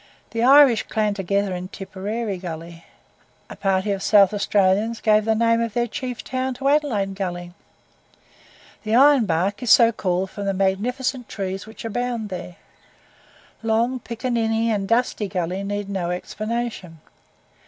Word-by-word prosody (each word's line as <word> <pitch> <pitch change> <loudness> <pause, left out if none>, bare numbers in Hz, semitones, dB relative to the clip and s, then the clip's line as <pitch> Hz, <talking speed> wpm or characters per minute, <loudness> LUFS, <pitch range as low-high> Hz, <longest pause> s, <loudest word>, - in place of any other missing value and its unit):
The 230 +1 -2
Irish 265 -2 +6
clan 215 -1 0
together 200 0 -1
in 180 0 -5
Tipperary 200 +1 -5
Gully. 170 -1 -8 0.7
A - - -7
party 195 +1 0
of 195 -1 -2
South 200 -1 +5
Australians 205 +2 +1
gave 215 -1 +3
the 220 0 +2
name 230 +1 +2
of 230 -2 -3
their 240 0 +2
chief 250 +1 -5
town 260 0 -3
to 275 +2 0
Adelaide 245 -10 +1
Gully. 175 -2 -5 1.3
The 220 +1 0
Iron 270 -3 +6
Bark 185 +6 0
is 245 - -3
so 230 0 +7
called 185 -3 -2
from 200 -1 -5
the 195 - 0
magnificent 240 +6 -1
trees 195 0 -5
which 220 +1 -10
abound 235 -1 -3
there. 180 -1 -7 1.1
Long, 230 +3 0
Piccaninny, 230 -1 -1
and 200 -2 -1
Dusty 230 -2 0
Gully 185 0 -3
need 205 0 -3
no 190 -3 -3
explanation. 215 -2 -4
210 Hz, 145 wpm, -22 LUFS, 190-235 Hz, 1.3 s, so